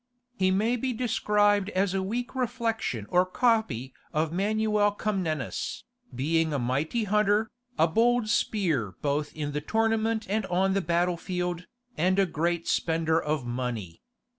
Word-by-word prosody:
He 185 -4 +2
may 215 +6 +2
be 255 +1 -1
described 205 -4 +2
as 190 -1 0
a 195 - 0
weak 235 +6 -3
reflection 230 - -2
or 180 +1 +4
copy 185 - 0 0.2
of 155 +1 0
Manuel 210 +1 +1
Comnenus, 185 -9 -2 0.3
being 160 +5 +1
a - - +1
mighty 140 - -1
hunter, 210 +1 +2 0.3
a 160 - +4
bold 235 +6 +2
spear 165 - 0
both 145 +1 0
in 150 -2 -3
the 150 +1 -2
tournament 225 +3 0
and 210 -1 -1
on 190 +2 +1
the 195 - +1
battle 175 +1 +1
field, 180 0 -3 0.3
and 185 +3 +2
a 195 - +4
great 170 0 -1
spender 160 0 +1
of 150 -4 -2
money. 120 -8 -4
185 Hz, 145 wpm, -27 LUFS, 155-215 Hz, 0.3 s, or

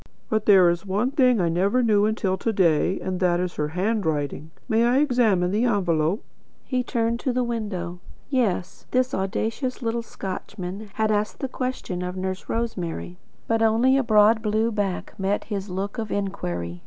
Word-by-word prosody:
But 220 -1 0
there 190 -4 +7
is 170 -1 -3
one 205 +6 0
thing 255 -5 +4
I 175 - +2
never 195 +9 +2
knew 210 -2 +4
until 210 -3 0
to 225 +4 -1
day 185 -2 +2
and 185 -1 -3
that 175 -2 +2
is 180 -1 -2
her 150 - 0
handwriting. 160 -5 -1 0.2
May 225 -1 +3
I 240 +2 +3
examine 235 -11 +3
this 230 +5 +2
envelope?" 175 -3 +1 0.4
He 255 -1 0
turned 235 -1 -1
to 260 - -1
the 250 0 0
window; 205 -7 -4 0.3
yes, 215 -9 -1
this 255 +1 +1
audacious 225 +7 -2
little 230 +1 -1
Scotchman 195 -1 -6
had 220 -1 +1
asked 210 0 0
the 270 - -3
question 255 -8 -4
of 180 +1 -4
Nurse 185 0 -4
Rosemary. 180 -6 -3 0.3
But 225 0 +1
only 225 +4 +4
a 275 - +4
broad 220 -1 +4
blue 220 +1 +1
back 205 -4 -2
met 195 +2 0
his 200 -2 -4
look 195 +5 -4
of 220 -1 -3
inquiry. 90 - -3
205 Hz, 175 wpm, -24 LUFS, 180-230 Hz, 0.4 s, there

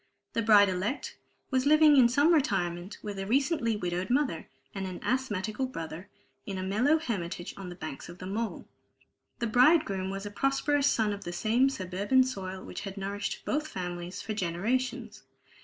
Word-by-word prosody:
The 230 - +1
bride 210 -2 +6
elect 190 +8 -2 0.4
was 260 +1 +2
living 305 0 +7
in 250 -3 +7
some 285 +7 +4
retirement, 180 - 0
with 205 -2 -5
a 195 - -4
recently 265 - +1
widowed 180 -2 -2
mother 260 - 0 0.3
and 195 -1 -4
an 185 - -6
asthmatical 240 -1 -1
brother, 165 -4 -7 0.3
in 195 +4 -5
a 185 - -3
mellow 230 +11 +3
hermitage 185 - -4
on 195 -2 -7
the 175 - -8
banks 155 -4 -7
of 175 - -10
the 185 - -8
Mole. 215 +4 -3 0.7
The 235 - -2
bridegroom 235 - +3
was 195 +1 -5
a 205 - -5
prosperous 275 +4 +1
son 215 -2 +1
of 200 - -7
the 175 - -5
same 230 +9 +2
suburban 200 +3 +1
soil 190 -7 -5
which - - -7
had 195 -1 -7
nourished 200 +1 -4
both 300 +1 -1
families 180 - -5
for 220 - -3
generations. 210 +7 -2
205 Hz, 175 wpm, -29 LUFS, 185-260 Hz, 0.7 s, living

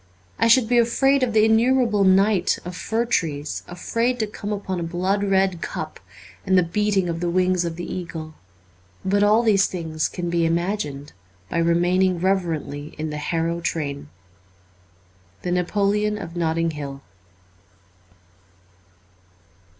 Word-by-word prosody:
I - - +4
should 230 0 +5
be 240 +1 +3
afraid 270 +4 +3
of 255 -2 +1
the 215 0 +4
innumerable 225 -1 +3
night 195 0 +3
of 180 0 -6
fir 225 +5 -1
trees, 150 -10 -2
afraid 230 +7 -1
to 220 - 0
come 205 0 -6
upon 195 -3 -3
a 165 -1 -4
blood 190 +4 0
red 190 -3 +1
cup - - -5 0.4
and 190 -1 +2
the 180 - +5
beating 195 +1 0
of 165 -1 -3
the 175 0 -1
wings 180 0 +1
of 165 -1 -3
the 175 - -6
eagle. 165 -3 -6 0.7
But 200 +1 +2
all 210 +3 +4
these 200 -4 +4
things 160 -3 -3
can 175 -1 -4
be 170 -1 +1
imagined 165 -4 -2 0.4
by 170 - -1
remaining 175 +2 +2
reverently 165 -6 -2
in 155 0 -3
the 150 - -4
Harrow 165 +2 -1
train. 140 - -3 0.6
' 90 +1 -34
The 180 - -2
Napoleon 205 +4 +1
of 175 -4 -8
Notting 165 -1 0
Hill.' 140 -2 -7
180 Hz, 145 wpm, -23 LUFS, 165-205 Hz, 0.7 s, should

